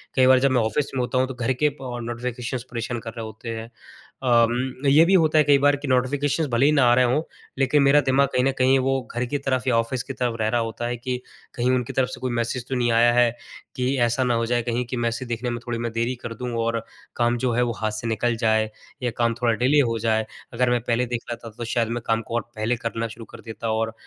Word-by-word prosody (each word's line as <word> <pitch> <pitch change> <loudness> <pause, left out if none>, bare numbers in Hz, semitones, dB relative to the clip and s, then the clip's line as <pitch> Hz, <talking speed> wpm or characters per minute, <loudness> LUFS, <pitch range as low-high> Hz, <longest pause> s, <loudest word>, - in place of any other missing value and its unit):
कई 130 -1 +5
बार 130 0 +6
जब 135 +1 +2
मैं 125 -2 +3
ऑफ़िस 110 +6 -1
में - - -1
होता 125 +1 -1
हूँ 130 0 +2
तो 130 - -6
घर 125 +1 0
के - - +6
अ, 150 - 0
नोटिफ़िकेशंस 120 0 -4
परेशान 120 0 -3
कर 115 0 -7
रहे 115 - -4
होते 110 +2 -8
हैं। 115 - -8 0.5
अ 130 - 0 0.2
उम, 130 +3 -2
ये 150 +4 +7
भी 185 - +2
होता 160 -4 +4
है 150 - +6
कई 145 0 +5
बार 145 +1 +4
की 145 0 -7
नोटिफ़िकेशंस 140 +4 +1
भले 120 +3 +2
ही 150 - +5
ना 140 -3 +4
आ - - +6
रहे 130 0 +4
हों 130 +6 +2 0.4
लेकिन 135 +2 +3
मेरा 140 +2 +5
दिमाग 140 0 +3
कहीं 125 - +2
न 135 - +3
कहीं 130 +1 +4
वो 135 0 +1
घर 120 - 0
की 145 +4 -2
तरफ 130 -2 -1
या 120 -3 +3
ऑफ़िस 115 +2 -1
की 135 - -6
तरफ 125 -2 -1
रह 110 - +1
रहा 120 +1 +1
होता 115 +1 -3
है 120 - -3
कि 125 +2 -3 0.4
कहीं 125 +1 +1
उनकी 125 -2 -1
तरफ 130 -1 +1
से - - -8
कोई 130 -1 -2
मैसेज 120 +1 -2
तो 135 - -1
नहीं 120 -1 +1
आया 120 +1 +5
है, 120 -1 +4 0.4
कि 130 +1 0
ऐसा 120 +2 +2
ना 125 -1 +1
हो 115 0 0
जाए 120 +1 +1
कहीं 120 +1 -1
कि 125 +1 -5
मैसेज 120 +1 -2
देखने 120 +1 -3
में 120 0 -3
थोड़ी 120 -1 -2
मैं 120 0 -3
देरी 115 +2 -1
कर 120 - -5
दूँ 125 +1 -5
और 115 0 0 0.4
काम 120 0 +1
जो 125 0 0
है 120 - +2
वो 120 - 0
हाथ 110 - 0
से 110 +2 -5
निकल 115 +1 0
जाए 110 -1 +2 0.3
या 120 - 0
काम 115 -1 +2
थोड़ा 120 -1 +3
डिले 130 +6 +3
हो 115 - -1
जाए, 110 0 +1 0.3
अगर 125 +1 +1
मैं 120 0 +2
पहले 120 +1 +1
देख 120 -1 -3
लेता 115 0 -6
तो 120 - -4
शायद 115 0 0
मैं 120 +1 -2
काम 115 0 +1
को 115 - 0 0.2
पहले 110 +3 0
करना 115 0 -3
शुरू 115 +1 -10
कर - - -11
देता 115 0 -5
और 110 0 -1
120 Hz, 270 wpm, -23 LUFS, 115-130 Hz, 0.5 s, ये